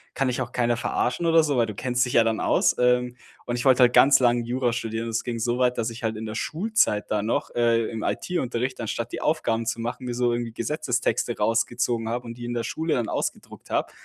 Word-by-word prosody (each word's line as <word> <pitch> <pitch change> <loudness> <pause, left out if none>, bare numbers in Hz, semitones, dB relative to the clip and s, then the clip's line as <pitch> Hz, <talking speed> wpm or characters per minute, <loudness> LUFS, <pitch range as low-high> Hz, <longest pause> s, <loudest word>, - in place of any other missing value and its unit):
kann 135 -1 +1
dich 125 +1 -2
auch 120 -1 -4
keiner 120 -1 +1
verarschen 125 +6 -1
oder 165 -1 +5
so, 145 -3 0
weil 115 -1 +3
du 105 - -6
kennst 125 +2 0
dich 125 - -5
ja 115 - +6
dann 115 -1 0
aus.“ - - +2
Ähm, 125 0 +2 0.3
und 120 - -2
ich 120 - -4
wollte 130 -1 +5
halt 120 0 +4
ganz 135 0 +6
lange 120 -1 +3
Jura 125 0 -1
studieren. 115 -1 -3
Das 115 -1 -2
ging 120 -1 -3
so 120 +2 -1
weit, 125 -1 +2
dass 115 0 -1
ich 115 - -9
halt 110 -2 -1
in 110 - -5
der 110 - -5
Schulzeit 160 - 0
da 105 -1 +1
noch, 110 +3 -1
äh, 115 -1 +2
im 110 -1 -5
IT-Unterricht, 130 -7 -2
anstatt 115 +1 -3
die - - -5
Aufgaben 115 -7 0
zu 115 +1 -2
machen, 120 +2 -4
mir 120 - -3
so 120 -1 +1
irgendwie 120 -1 -3
Gesetzestexte 125 -2 -1
rausgezogen 115 +1 0
habe 120 +1 -3
und 115 - -6
die 120 0 -8
in 120 0 -4
der 120 - -1
Schule 160 +5 -1
dann 120 -3 -1
ausgedruckt - - -5
habe, - - -1
120 Hz, 245 wpm, -25 LUFS, 115-125 Hz, 0.3 s, ja